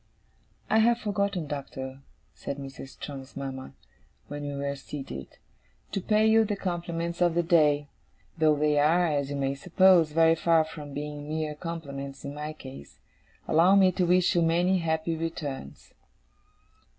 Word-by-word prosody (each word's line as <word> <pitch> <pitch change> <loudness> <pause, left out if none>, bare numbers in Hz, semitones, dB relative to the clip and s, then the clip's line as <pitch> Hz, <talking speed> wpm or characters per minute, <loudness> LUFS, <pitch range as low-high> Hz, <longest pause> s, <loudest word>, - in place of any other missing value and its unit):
'I 220 - +5
have 235 +1 +4
forgotten, 200 -5 -1
Doctor,' 135 -2 -6 0.3
said 140 - -6
Mrs. 135 -1 -8
Strong's 135 -2 -8
mama, 135 - -6 0.5
when 145 0 -5
we 145 -1 -4
were 140 0 -2
seated, 135 - -8 0.5
'to 195 - -2
pay 215 +3 +2
you 220 0 +5
the 210 -1 -2
compliments 170 -2 -3
of 175 -2 +3
the 175 - +2
day 150 -4 +3 0.5
though 155 -2 +3
they 150 0 +2
are, 165 +5 +4
as 145 -4 0
you 145 - -3
may 135 -1 0
suppose, 175 +2 +4
very 165 +1 +5
far 165 -1 +3
from 150 -3 -9
being 145 0 -5
mere 155 -1 -2
compliments 140 -4 -7
in 140 - -5
my 150 +1 -5
case. 135 -3 -11 0.5
Allow 175 +5 +5
me 190 -2 +6
to 180 -1 0
wish 180 0 +3
you 175 - +2
many 175 +3 +2
happy 160 0 -1
returns. 155 - -6
155 Hz, 155 wpm, -27 LUFS, 140-175 Hz, 0.5 s, me